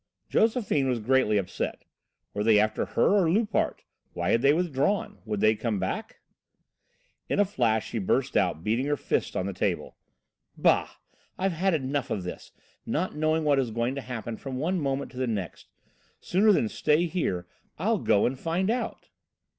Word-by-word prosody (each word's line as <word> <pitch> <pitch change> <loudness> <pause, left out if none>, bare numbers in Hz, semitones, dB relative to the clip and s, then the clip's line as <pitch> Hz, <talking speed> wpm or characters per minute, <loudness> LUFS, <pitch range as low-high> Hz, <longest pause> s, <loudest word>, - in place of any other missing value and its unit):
Josephine 215 - +2
was 125 -2 0
greatly 115 -2 +2
upset. 95 -3 -3 0.5
Were 105 - -1
they 110 -1 +5
after 110 +1 +1
her 205 - +2
or 165 - +2
Loupart? 210 +5 0 0.3
Why - - -1
had 115 - +3
they 140 +2 +5
withdrawn? 165 +3 0
Would 105 -2 -2
they 110 0 +5
come 110 -1 -2
back? - - -4 1.1
In - - 0
a 205 - +5
flash 115 - 0
she 115 - -2
burst 95 - 0
out, 80 - +1
beating 115 +7 0
her 145 0 +1
fist - - -1
on 95 - -1
the 100 - -3
table: - - -2 0.6
"Bah! - - +3 0.5
I've 190 +1 0
had 180 +2 +1
enough 140 -2 -2
of 95 - -2
this, 90 - -7 0.3
not 165 +11 -2
knowing 155 +1 +1
what 145 -2 +3
is 130 -3 0
going 115 +3 -1
to 140 - -4
happen 115 -3 -5
from 135 -2 -6
one 175 +7 0
moment 135 -1 -2
to 125 - -13
the 130 0 -1
next. 100 -7 -4 0.5
Sooner 205 +4 +3
than 150 - +3
stay 150 +9 +2
here, 155 - -2 0.3
I'll - - +1
go 100 - +3
and 130 +1 -1
find 180 +5 0
out." 240 -1 -4
135 Hz, 180 wpm, -27 LUFS, 110-170 Hz, 1.1 s, they